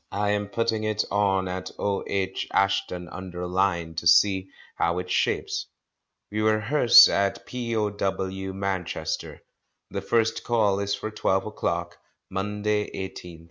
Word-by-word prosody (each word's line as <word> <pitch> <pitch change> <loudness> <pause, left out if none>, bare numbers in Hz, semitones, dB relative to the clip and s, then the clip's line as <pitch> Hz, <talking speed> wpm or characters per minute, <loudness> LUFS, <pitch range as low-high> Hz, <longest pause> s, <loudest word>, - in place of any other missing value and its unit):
I 105 +1 0
am 105 0 -1
putting 110 +1 -1
it 110 -1 0
on 95 -2 +2
at 90 0 -4
O.H. 100 -1 -2
Ashton 95 -2 0
under 90 -1 -6
Lyne 90 -2 0
to 85 - 0
see 95 +2 +4 0.2
how 85 +1 0
it 90 0 -4
shapes. - - 0 0.6
We 105 +1 -1
rehearse 115 +3 +7
at 100 0 0
P.O.W. 100 -5 -2
Manchester. 95 -2 -4 0.5
The - - -3
first 115 -1 +1
Call 105 -4 +2
is 100 0 -1
for 110 +2 -5
twelve 95 -2 0
o'clock, 85 -5 -3 0.3
Monday, 105 +2 -1
18th 95 -2 -7
inst. - - -15
100 Hz, 135 wpm, -25 LUFS, 95-105 Hz, 0.6 s, rehearse